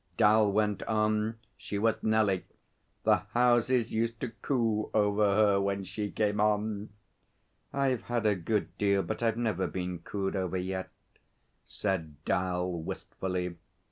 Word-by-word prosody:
Dal 105 Hz, 0 st, +5 dB
went 105 Hz, -1 st, +1 dB
on. 110 Hz, 0 st, +1 dB, 0.2 s
'She 100 Hz, -, -4 dB
was 110 Hz, +2 st, +1 dB
Nellie. 110 Hz, -4 st, +2 dB, 0.6 s
The -, -, +5 dB, 0.2 s
houses 120 Hz, 0 st, +3 dB
used 115 Hz, +1 st, -1 dB
to 125 Hz, -, -2 dB
coo 115 Hz, -5 st, 0 dB
over 105 Hz, -1 st, +3 dB
her 100 Hz, -2 st, +4 dB
when 100 Hz, 0 st, -1 dB
she 100 Hz, +3 st, -4 dB
came 105 Hz, 0 st, 0 dB
on.' 105 Hz, 0 st, 0 dB, 0.8 s
'I've 135 Hz, -3 st, +1 dB
had 120 Hz, -2 st, -1 dB
a 105 Hz, -, +5 dB
good 100 Hz, +4 st, -2 dB
deal, 100 Hz, -1 st, +3 dB
but -, -, -4 dB
I've 115 Hz, -1 st, +1 dB
never 110 Hz, -6 st, 0 dB
been 90 Hz, -1 st, -4 dB
cooed 95 Hz, +3 st, -3 dB
over 95 Hz, -1 st, -1 dB
yet,' 95 Hz, +1 st, -3 dB, 0.8 s
said 85 Hz, -7 st, -2 dB
'Dal 90 Hz, -1 st, 0 dB
wistfully. 90 Hz, +1 st, -4 dB
105 Hz, 140 wpm, -30 LUFS, 95-110 Hz, 0.8 s, Dal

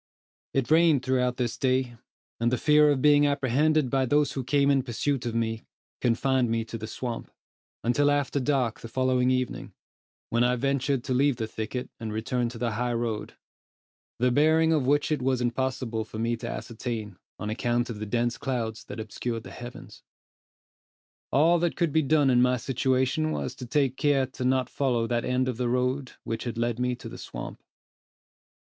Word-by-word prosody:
It 135 Hz, 0 st, 0 dB
rained 160 Hz, -5 st, +4 dB
throughout 125 Hz, -1 st, +1 dB
this 120 Hz, -2 st, -2 dB
day, 130 Hz, -2 st, +1 dB, 0.4 s
and 120 Hz, +1 st, +1 dB
the 130 Hz, -, +1 dB
fear 150 Hz, +1 st, +5 dB
of 140 Hz, -3 st, +1 dB
being 145 Hz, -1 st, +6 dB
apprehended 140 Hz, +1 st, +2 dB
by 135 Hz, -1 st, +2 dB
those 145 Hz, +1 st, +2 dB
who 135 Hz, -, -3 dB
came 140 Hz, +2 st, +3 dB
in 135 Hz, -1 st, +3 dB
pursuit 130 Hz, +1 st, -2 dB
of 115 Hz, -, -3 dB
me, 115 Hz, -1 st, -1 dB, 0.4 s
confined 125 Hz, +1 st, +1 dB
me 115 Hz, 0 st, 0 dB
to 115 Hz, -, -6 dB
the 110 Hz, -, -5 dB
swamp, 120 Hz, +1 st, -5 dB, 0.5 s
until 135 Hz, +5 st, +3 dB
after 145 Hz, -1 st, +1 dB
dark 130 Hz, -4 st, 0 dB
the -, -, -8 dB
following 130 Hz, +1 st, +1 dB
evening, 130 Hz, -1 st, -2 dB, 0.6 s
when 120 Hz, +1 st, +3 dB
I 125 Hz, 0 st, +3 dB
ventured 135 Hz, 0 st, 0 dB
to 130 Hz, -, -2 dB
leave 140 Hz, +1 st, +3 dB
the 115 Hz, -2 st, -3 dB
thicket, 110 Hz, +3 st, -5 dB
and 110 Hz, -2 st, -4 dB
return 120 Hz, +3 st, -1 dB
to 120 Hz, -, -9 dB
the 120 Hz, 0 st, -1 dB
high 120 Hz, +3 st, -1 dB
road, 115 Hz, -2 st, -3 dB, 0.8 s
the 125 Hz, +1 st, +2 dB
bearing 160 Hz, +4 st, +4 dB
of 145 Hz, -5 st, +1 dB
which 145 Hz, +2 st, +2 dB
it 150 Hz, -4 st, 0 dB
was 130 Hz, 0 st, +1 dB
impossible 125 Hz, -2 st, -1 dB
for 110 Hz, -, -9 dB
me 115 Hz, +1 st, 0 dB
to 115 Hz, +1 st, -6 dB
ascertain, 110 Hz, -5 st, -5 dB, 0.2 s
on 105 Hz, +2 st, -4 dB
account 120 Hz, +1 st, 0 dB
of 105 Hz, -, -7 dB
the 110 Hz, -, -4 dB
dense 120 Hz, +2 st, 0 dB
clouds 115 Hz, -5 st, -3 dB
that -, -, -8 dB
obscured 115 Hz, +1 st, -4 dB
the -, -, -10 dB
heavens. 120 Hz, 0 st, -10 dB, 1.3 s
All 165 Hz, +5 st, +4 dB
that 170 Hz, 0 st, 0 dB
could 170 Hz, -3 st, +1 dB
be 160 Hz, -, +4 dB
done 145 Hz, -2 st, +3 dB
in 125 Hz, -1 st, +4 dB
my 125 Hz, 0 st, +3 dB
situation, 130 Hz, +5 st, 0 dB
was 130 Hz, -, -3 dB
to 125 Hz, -1 st, -9 dB
take 135 Hz, 0 st, +1 dB
care 140 Hz, -3 st, +2 dB
not 130 Hz, 0 st, +2 dB
to -, -, -25 dB
follow 125 Hz, -5 st, +1 dB
that 120 Hz, 0 st, -1 dB
end 125 Hz, 0 st, +1 dB
of 125 Hz, -3 st, -2 dB
the 125 Hz, -1 st, 0 dB
road 125 Hz, +2 st, -1 dB
which 115 Hz, +1 st, -4 dB
had 120 Hz, -1 st, -4 dB
led 120 Hz, 0 st, -1 dB
me 125 Hz, 0 st, 0 dB
to -, -, -10 dB
the -, -, -9 dB
swamp. -, -, -7 dB
125 Hz, 190 wpm, -27 LUFS, 120-140 Hz, 1.3 s, being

